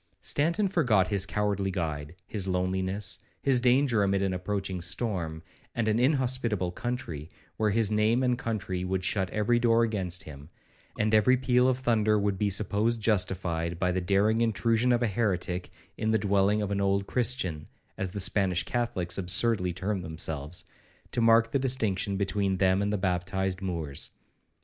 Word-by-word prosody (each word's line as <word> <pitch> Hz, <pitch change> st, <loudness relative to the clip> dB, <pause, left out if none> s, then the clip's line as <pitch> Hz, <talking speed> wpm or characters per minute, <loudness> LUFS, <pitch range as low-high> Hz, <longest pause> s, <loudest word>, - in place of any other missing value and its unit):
Stanton 170 Hz, +8 st, +1 dB
forgot 120 Hz, -, +2 dB
his 100 Hz, -2 st, 0 dB
cowardly 100 Hz, -1 st, -1 dB
guide, 80 Hz, -4 st, -4 dB
his 100 Hz, -3 st, -4 dB
loneliness, 95 Hz, +2 st, -1 dB, 0.2 s
his 135 Hz, -3 st, +3 dB
danger 125 Hz, -2 st, +3 dB
amid 100 Hz, 0 st, +1 dB
an 95 Hz, -1 st, 0 dB
approaching 95 Hz, 0 st, -3 dB
storm 85 Hz, -3 st, -1 dB, 0.3 s
and 115 Hz, -2 st, 0 dB
an 110 Hz, +1 st, +2 dB
inhospitable 125 Hz, -, +1 dB
country, 90 Hz, -, -5 dB, 0.3 s
where 110 Hz, -1 st, +2 dB
his 110 Hz, 0 st, +1 dB
name 110 Hz, +4 st, +2 dB
and 125 Hz, -1 st, +2 dB
country 100 Hz, -6 st, -3 dB
would 95 Hz, 0 st, -2 dB
shut 95 Hz, 0 st, 0 dB
every 110 Hz, +4 st, +1 dB
door 115 Hz, -1 st, +3 dB
against 95 Hz, -6 st, -1 dB
him, 75 Hz, 0 st, -11 dB, 0.5 s
and 110 Hz, 0 st, 0 dB
every 110 Hz, +4 st, +5 dB
peal 125 Hz, 0 st, +3 dB
of 130 Hz, -1 st, +2 dB
thunder 110 Hz, -4 st, +2 dB
would 100 Hz, -2 st, -1 dB
be 105 Hz, -, +1 dB
supposed 105 Hz, +4 st, 0 dB
justified 90 Hz, -5 st, 0 dB
by 90 Hz, +1 st, +1 dB
the 90 Hz, +1 st, -1 dB
daring 105 Hz, +5 st, +2 dB
intrusion 115 Hz, +1 st, +2 dB
of 120 Hz, 0 st, +2 dB
a -, -, +2 dB
heretic 95 Hz, -4 st, -1 dB, 0.3 s
in 110 Hz, -, 0 dB
the 110 Hz, -, +3 dB
dwelling 100 Hz, 0 st, +2 dB
of 100 Hz, -, -3 dB
an 100 Hz, 0 st, 0 dB
old 100 Hz, 0 st, +1 dB
Christian, 115 Hz, -, -1 dB, 0.3 s
as 95 Hz, -1 st, -2 dB
the 100 Hz, -, -5 dB
Spanish 95 Hz, -2 st, +2 dB
Catholics 100 Hz, -7 st, -1 dB
absurdly 95 Hz, +1 st, +1 dB
term 95 Hz, +2 st, -3 dB
themselves, 80 Hz, 0 st, -4 dB, 0.5 s
to 120 Hz, -, 0 dB
mark 115 Hz, 0 st, +4 dB
the 140 Hz, -, +1 dB
distinction 110 Hz, -7 st, 0 dB
between 100 Hz, -1 st, 0 dB
them 95 Hz, +1 st, +2 dB
and 100 Hz, 0 st, 0 dB
the 105 Hz, -, 0 dB
baptised 95 Hz, 0 st, -1 dB
Moors. 80 Hz, -7 st, -3 dB
100 Hz, 165 wpm, -28 LUFS, 90-115 Hz, 0.5 s, every